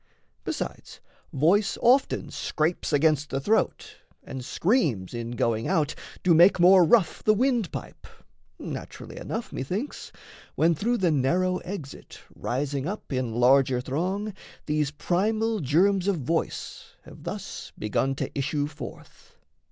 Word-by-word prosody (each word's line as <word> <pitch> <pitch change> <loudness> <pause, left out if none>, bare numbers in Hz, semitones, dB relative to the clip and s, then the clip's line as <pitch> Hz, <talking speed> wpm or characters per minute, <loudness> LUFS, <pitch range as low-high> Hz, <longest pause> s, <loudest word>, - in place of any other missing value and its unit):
Besides - - -5 0.3
voice 190 +9 +2
often 255 +3 +2
scrapes 160 +2 -1
against 150 -1 +2
the 135 - -1
throat, 210 +11 0 0.3
And 130 -1 -7
screams 150 - 0
in 120 -1 -4
going 115 -1 0
out 155 -2 +1 0.3
do 180 - +5
make 175 +4 +6
more 180 +1 +7
rough 185 +1 +3
The 215 - +4
wind 240 - +1
pipe - - -8 0.5
naturally - - -8
enough, - - -5
methinks, 190 - -4 0.4
When, 165 +2 +3
through 235 +10 0
the 180 -5 +2
narrow 180 +7 +1
exit 170 -8 -8
rising 140 +2 -2
up 200 -6 -5
In 125 -3 -2
larger 130 +1 +4
throng, 185 +11 -2 0.3
these 150 -1 0
primal 215 +9 0
germs 185 +6 +2
of 200 - +2
voice 160 +2 -3
Have - - -14
thus - - -6
begun 130 +6 0
to - - -4
issue 145 +1 -1
forth. 150 +1 -11
160 Hz, 130 wpm, -26 LUFS, 135-195 Hz, 0.5 s, more